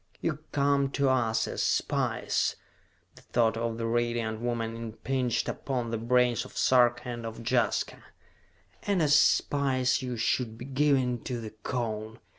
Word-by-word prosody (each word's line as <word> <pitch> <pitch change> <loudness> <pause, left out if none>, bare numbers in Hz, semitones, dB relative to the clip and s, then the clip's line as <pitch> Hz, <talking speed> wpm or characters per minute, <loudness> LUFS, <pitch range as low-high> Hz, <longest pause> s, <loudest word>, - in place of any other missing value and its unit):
"You 155 -3 -2
come 140 -1 +2
to 140 -1 +2
us 115 -4 +1
as - - -3
spies," - - 0 0.6
the - - -17
thought 115 -2 +1
of 115 0 -2
the 115 - -3
Radiant 115 -1 -1
Woman 115 -2 -2
impinged 115 +2 -2
upon 125 -4 -3
the 115 - -2
brains 120 0 +2
of 130 - -12
Sarka 120 -1 +3
and 120 -1 -5
of 115 0 -7
Jaska, 125 -2 0 0.8
"and 200 -2 0
as 145 -1 +3
spies 140 -3 +3
you 125 -2 -4
should 115 0 0
be 120 - -8
given 135 -3 +1
to 125 -2 -3
the 110 -2 -7
Cone. 110 -1 -4
120 Hz, 150 wpm, -28 LUFS, 115-130 Hz, 0.8 s, Sarka